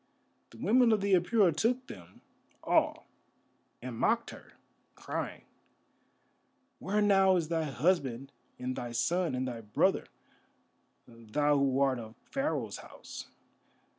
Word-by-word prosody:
The - - -15
women 245 0 +4
of 215 - +3
the 200 0 +1
Apura 180 -1 +3
took 250 +8 +1
them 90 - -12 0.4
all - - +1 0.8
and 125 -2 -5
mocked 230 - +1
her, - - -14 0.4
crying: - - -5 1.4
"Where 210 +2 0
now 195 -2 +5
is 165 -3 -1
thy 165 -1 0
husband 135 -3 0 0.3
and 125 +1 -4
thy 120 -1 -5
son 170 +5 0
and 130 +1 -2
thy 120 -2 -5
brother, 105 -1 +1 1.0
thou 120 +6 0
who 135 -1 +2
art 135 -2 +2
of 110 0 -10 0.2
Pharaoh's 275 +2 -2
house? - - -10
150 Hz, 125 wpm, -31 LUFS, 125-195 Hz, 1.4 s, now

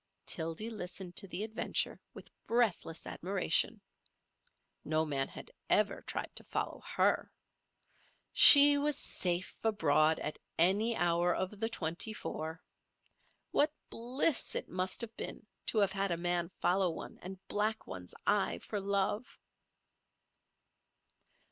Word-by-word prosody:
Tildy 165 +7 -4
listened 180 -3 -7
to 195 - -1
the 185 +2 -4
adventure 220 +1 -2
with - - -12 0.2
breathless 220 -8 0
admiration. 190 +1 0 1.0
No 155 +1 0
man 140 -3 -1
had - - -11 0.2
ever - - +3
tried - - -5
to - - -5
follow - - -4
her. - - +2 1.0
She 285 0 +10
was 295 0 +1
safe 180 -9 -2
abroad 160 -7 +2
at 150 - -5 0.2
any 205 +7 +4
hour 175 -1 +1
of 190 +2 -4
the 225 +1 -1
twenty 175 +1 -2
four. 160 -4 -6 0.9
What 295 +1 +2 0.2
bliss 250 +5 0
it - - -2
must 185 +4 -2
have 230 -1 -6
been - - -6 0.2
to - - -1
have 200 -2 +3
had 195 0 -1
a 170 - -1
man 175 0 -1
follow 180 +1 +2
one 165 - -8
and 190 +1 -8
black 215 +1 -1
one's 90 -1 -8
eye 85 - +1
for 205 - -5
love! 200 +3 -2
190 Hz, 130 wpm, -32 LUFS, 170-220 Hz, 1.0 s, She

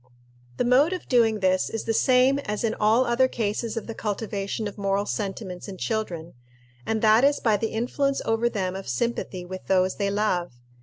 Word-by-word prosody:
The - - +1
mode 275 +8 +4
of 365 - -6
doing 225 -4 +3
this 185 0 +2
is 225 - -4
the 225 - -1
same 255 +3 +4
as 210 -6 -4
in 225 -1 +1
all 220 +4 +3
other 245 +2 +3
cases 225 -1 -2
of 225 - -3
the 225 - -6
cultivation 210 0 -3
of 205 - -8
moral 200 0 0
sentiments 195 -3 -4
in 195 -2 -7
children, 180 -7 -3 0.5
and 220 0 -1
that 220 +3 +5
is 285 +1 +4
by 220 -3 +2
the 225 +2 -1
influence 270 +5 -1
over 225 +1 +1
them 190 -4 -2
of 195 - -7
sympathy 185 - -2
with 185 +1 -8
those 185 -1 +2
they 200 -1 0
love. 200 -6 0
215 Hz, 195 wpm, -25 LUFS, 195-235 Hz, 0.5 s, that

